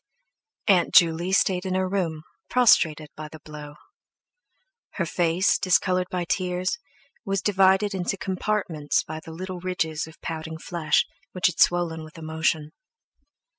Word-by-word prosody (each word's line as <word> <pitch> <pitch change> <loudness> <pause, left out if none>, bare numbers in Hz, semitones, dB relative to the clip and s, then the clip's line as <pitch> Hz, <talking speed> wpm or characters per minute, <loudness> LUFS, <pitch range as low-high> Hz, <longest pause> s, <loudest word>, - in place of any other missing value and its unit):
Aunt 185 -4 +3
Juley 170 0 +5
stayed 185 -1 +2
in 185 -1 -2
her 185 0 +1
room, 170 -5 -2 0.3
prostrated 160 -11 +4
by 155 0 -7
the 155 +1 -12
blow. 150 -1 -9 1.2
Her 170 - -1
face, 175 +3 +1
discoloured 180 +1 +2
by 180 -1 -2
tears, 185 +5 -1 0.4
was 195 0 -1
divided 195 +1 +3
into 190 +1 -2
compartments 185 -6 -1
by 155 0 -6
the 165 - -10
little 185 +2 -6
ridges 160 -4 -2
of 160 - -15
pouting 160 0 -5
flesh 170 -1 +1 0.3
which 185 - -2
had 180 - +2
swollen 170 -2 +2
with 155 +2 -13
emotion. 160 -1 -1
175 Hz, 135 wpm, -25 LUFS, 160-185 Hz, 1.2 s, Juley